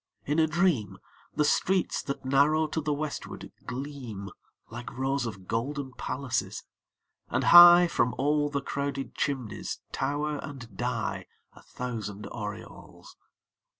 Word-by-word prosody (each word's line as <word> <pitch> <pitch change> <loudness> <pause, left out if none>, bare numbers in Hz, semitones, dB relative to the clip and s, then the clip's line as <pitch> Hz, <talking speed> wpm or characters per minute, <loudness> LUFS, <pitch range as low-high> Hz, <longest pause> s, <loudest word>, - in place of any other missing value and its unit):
In 150 +3 +1
a 160 - +4
dream 155 - +1 0.4
The 150 - +2
streets 185 +4 +1
that 140 -3 -5
narrow 145 +4 +3
to 160 +1 -2
the 150 0 -1
westward 145 0 -5 0.2
gleam 125 -7 -6 0.4
Like 120 +1 -8
rows 135 -1 0
of 95 -4 -8
golden 135 +3 -3
palaces; 130 0 -3 0.7
and - - 0
high 175 0 +10
From 125 -7 +1
all 145 +1 +2
the 140 -1 -2
crowded 140 -1 -3
chimneys 130 -7 -3
tower 145 +2 -1
and 125 -8 -9
die 120 0 -2 0.3
A - - -16
thousand 110 -4 -6
aureoles. 105 -3 -8
140 Hz, 125 wpm, -28 LUFS, 120-150 Hz, 0.7 s, high